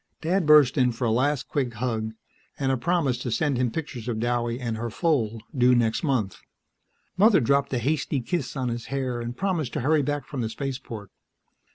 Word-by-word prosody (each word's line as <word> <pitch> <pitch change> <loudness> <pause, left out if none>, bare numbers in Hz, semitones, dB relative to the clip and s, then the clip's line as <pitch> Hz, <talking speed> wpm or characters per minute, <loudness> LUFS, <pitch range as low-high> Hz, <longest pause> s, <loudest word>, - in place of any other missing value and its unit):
Dad 170 +1 +1
burst 150 -3 +6
in 125 -1 +4
for 115 +2 -3
a 115 - +2
last 135 +4 +1
quick 125 -5 -2
hug 110 -1 -2 0.4
and 135 -1 0
a - - +2
promise 135 -2 0
to 125 - -4
send 140 +3 0
him 125 -1 +2
pictures 125 -4 -5
of 120 -3 -1
Douwie 120 +1 -1
and 120 -3 -3
her 115 +1 -3
foal, 115 -7 0
due 125 -1 +5
next 115 -2 +1
month; 130 - -1 0.8
Mother 205 0 +6
dropped 140 +2 +2
a 130 - 0
hasty 140 +3 0
kiss 140 +3 -3
on 130 -2 -1
his 120 -1 -4
hair 130 -2 -2
and 120 +1 -5
promised 175 -10 -1
to - - -2
hurry 150 +4 +3
back 145 -1 -2
from 140 -3 -5
the 110 - -2
Spaceport. 120 -5 -6
125 Hz, 200 wpm, -25 LUFS, 120-145 Hz, 0.8 s, burst